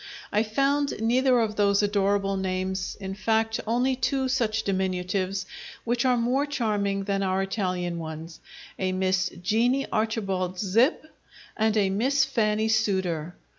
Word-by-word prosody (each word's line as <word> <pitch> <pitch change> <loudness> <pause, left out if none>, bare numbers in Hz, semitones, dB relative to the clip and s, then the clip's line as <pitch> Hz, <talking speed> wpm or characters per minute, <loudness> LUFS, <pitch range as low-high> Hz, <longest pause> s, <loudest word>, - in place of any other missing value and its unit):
I 210 - +3
found 275 +6 0
neither 250 +3 +3
of 215 -2 -1
those 200 0 +3
adorable 200 -1 +1
names 190 0 -2
in 190 -1 -5
fact, 225 +2 0
only 250 +3 +1
two 265 +1 0
such 225 -4 0
diminutives, 190 0 -1 0.4
which 240 +1 0
are 250 -1 +3
more 255 +5 +1
charming 205 -7 -1
than 195 0 -1
our 190 0 +1
Italian 180 -3 -2
ones: 160 +1 -7 0.4
A 185 -1 0
Miss 185 0 +1
Jeanie 240 +7 +2
Archibald 195 -5 -1
Zip 225 - +2 0.5
and 220 0 +1
a 195 -2 +2
Miss 265 +7 +2
Fannie 220 -4 +1
Sooter. 190 -7 0
205 Hz, 135 wpm, -26 LUFS, 190-235 Hz, 0.5 s, I